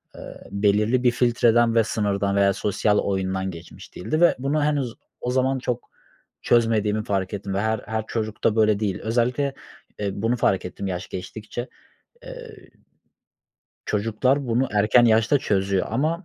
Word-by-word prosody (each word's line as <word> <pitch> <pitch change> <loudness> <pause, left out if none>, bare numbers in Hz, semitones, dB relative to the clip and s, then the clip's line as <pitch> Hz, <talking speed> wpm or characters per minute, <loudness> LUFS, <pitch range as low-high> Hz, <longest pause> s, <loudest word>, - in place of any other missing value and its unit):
ııı, - - -10
belirli 105 +5 +2
bir 125 - +5
filtreden 120 -1 +3
ve 115 - +5
sınırdan 100 -2 -1
veya 100 0 +3
sosyal 105 +1 +1
oyundan 95 -1 -1
geçmiş 85 0 -12
değildi 155 - -2
ve 175 - +5
bunu 145 +3 0
henüz 140 -5 -1 0.3
o 125 - -2
zaman 130 +1 +1
çok 125 -1 -4 0.5
çözmediğimi 110 -2 +2
fark 95 -1 -2
ettim 100 -1 -4
ve 100 - 0
her 110 0 0
her 110 -1 -2
çocukta 110 -1 -1
böyle 110 -2 +3
değil. 100 -4 -2
Özellikle, 125 +5 0 0.5
eee, 105 -1 -1
bunu 115 +5 -1
fark 95 -5 +1
ettim, 90 +2 -5
yaş 90 -1 -4
geçtikçe. 110 +6 -6 0.6
Eee, 485 -5 -11 1.2
çocuklar 115 +6 0
bunu 120 +3 +1
erken 105 +4 +4
yaşta 115 +5 +4
çözüyor 95 -4 0
ama, 155 - -1
110 Hz, 150 wpm, -23 LUFS, 100-125 Hz, 1.2 s, bir